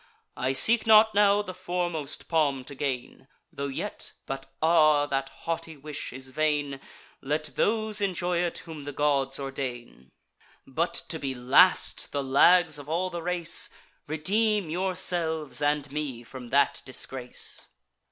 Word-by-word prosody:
I 130 +1 -1
seek 225 - +4
not 220 0 +7
now 205 0 +4
the 185 - -7
foremost 175 -5 -4
palm 145 -5 +1
to 140 - -9
gain; 130 -2 -4 0.3
Tho' 140 - -3
yet——But, 135 0 -6
ah! 155 -3 +4
that 135 -1 -2
haughty 165 -1 -5
wish 145 +1 -6
is 130 +1 -8
vain! 145 -1 0 0.4
Let 150 +2 -2
those 215 -1 0
enjoy 180 -3 0
it 175 -1 -1
whom 155 -4 -9
the 145 - -6
gods 135 -2 +1
ordain. 125 - -6 0.6
But 160 +6 -1
to 160 - -3
be 135 -2 -3
last, 130 +9 +4
the 140 -1 -1
lags 150 +4 +5
of 145 +1 -10
all 180 +3 -1
the 170 - -5
race! 175 -1 +1 0.4
Redeem 200 +4 +1
yourselves 175 -4 -1
and 145 -1 0
me 140 -5 -4
from 125 +1 -10
that 140 +3 +2
disgrace." 130 -1 -4
150 Hz, 140 wpm, -27 LUFS, 135-175 Hz, 0.6 s, not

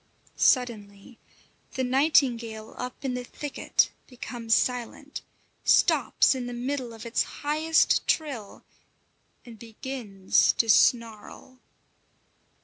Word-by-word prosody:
Suddenly 225 -3 0 0.5
the 260 - -2
nightingale 250 -5 +1
up 250 +2 -7
in 260 - -1
the 250 0 -4
thicket 290 +3 -1 0.2
becomes 235 -2 -2
silent, 250 +4 -3 0.4
stops - - +3
in 255 -2 -5
the 245 - -6
middle 250 0 -4
of 225 0 -11
its 235 - 0
highest 310 +2 +1
trill, 265 -10 -2 0.8
and 230 -3 -13
begins 225 -4 0
to 230 - 0
snarl. 230 +3 +1
245 Hz, 100 wpm, -26 LUFS, 225-265 Hz, 0.8 s, stops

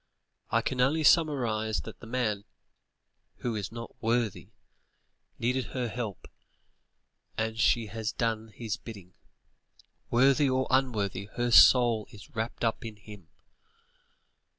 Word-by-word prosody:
I - - +1
can 130 -1 -1
only 155 +5 +2
surmise 120 -10 +2
that - - -10
the 115 - -11
man, 110 -4 -1 0.9
who 120 -2 -3
is 105 -1 -4
not 115 0 -9
worthy 115 -2 -1 0.9
needed 125 +1 0
her 125 0 -3
help 110 -5 -5 1.1
and 110 0 -2
she 115 0 +3
has 110 +1 -4
done 115 -2 -2
his 110 0 -5
bidding. 100 -6 -11 1.0
Worthy 135 +3 +4
or 130 0 +1
unworthy, 110 -7 0
her 120 0 0
soul 120 -3 +6
is 105 +3 -15
wrapped 115 +2 -3
up 115 - -1
in 110 -2 -7
him. 105 -4 -13
115 Hz, 125 wpm, -29 LUFS, 110-125 Hz, 1.1 s, soul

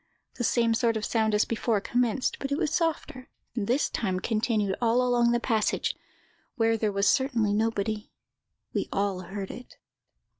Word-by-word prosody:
The 245 - -2
same 230 -1 +2
sort 230 -1 +1
of 215 - -3
sound 220 -2 +1
as 210 - +3
before 230 -1 0
commenced, 245 +3 0
but 275 - -4
it 280 - +1
was 315 -3 -1
softer, 315 -6 -2 0.3
and 210 -4 -2
this 255 +5 +2
time 190 -5 -2
continued 215 -2 0
all 240 +1 +3
along 240 -1 +3
the 240 - +2
passage, 225 -3 0 0.6
where 225 -2 +2
there 215 -1 0
was 200 0 +1
certainly 240 -6 +2
nobody. 215 0 -1 0.6
We - - -1
all 200 -2 0
heard 195 +1 -6
it. 250 - -11
225 Hz, 165 wpm, -27 LUFS, 210-245 Hz, 0.6 s, as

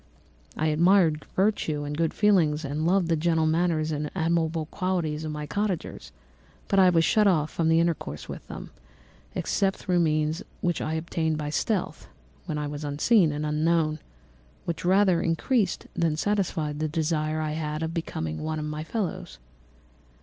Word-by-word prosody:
I 155 - 0
admired 165 0 +3
virtue 185 -7 +1
and 145 0 -4
good 165 0 +1
feelings 165 -8 +2
and 150 +3 -1
loved 185 -1 +3
the 165 - +2
gentle 160 0 +1
manners 160 -1 +1
and 150 0 -2
amiable 165 -2 0
qualities 170 -4 -2
of 155 - -3
my 150 0 -4
cottagers, 200 +2 -3 0.6
but 195 - +3
I 185 -1 +7
was 165 -2 +3
shut 210 -1 +4
out 155 -5 +2
from 165 -1 0
intercourse 165 - 0
with - - -8
them, - - -8 0.6
except 195 -1 0
through 180 -3 0
means 155 0 +1 0.2
which 175 -2 -1
I 155 - -2
obtained 160 -1 -1
by 150 -1 -3
stealth, 200 +4 -2 0.4
when 155 -3 -2
I 150 - -2
was 145 +1 -5
unseen 155 +5 +3
and 150 +1 -3
unknown, 155 +1 +2
and 155 +1 -6 0.7
which 170 -2 -3
rather 185 -1 +4
increased 185 +4 0
than 165 -2 +1
satisfied 165 -6 -1
the 155 - 0
desire 155 0 -1
I 155 -1 -2
had 155 0 -3
of 160 +1 -3
becoming 80 - -3
one 155 0 -2
among 150 0 -3
my 150 0 -4
fellows. 195 - -4
160 Hz, 165 wpm, -26 LUFS, 150-175 Hz, 0.7 s, I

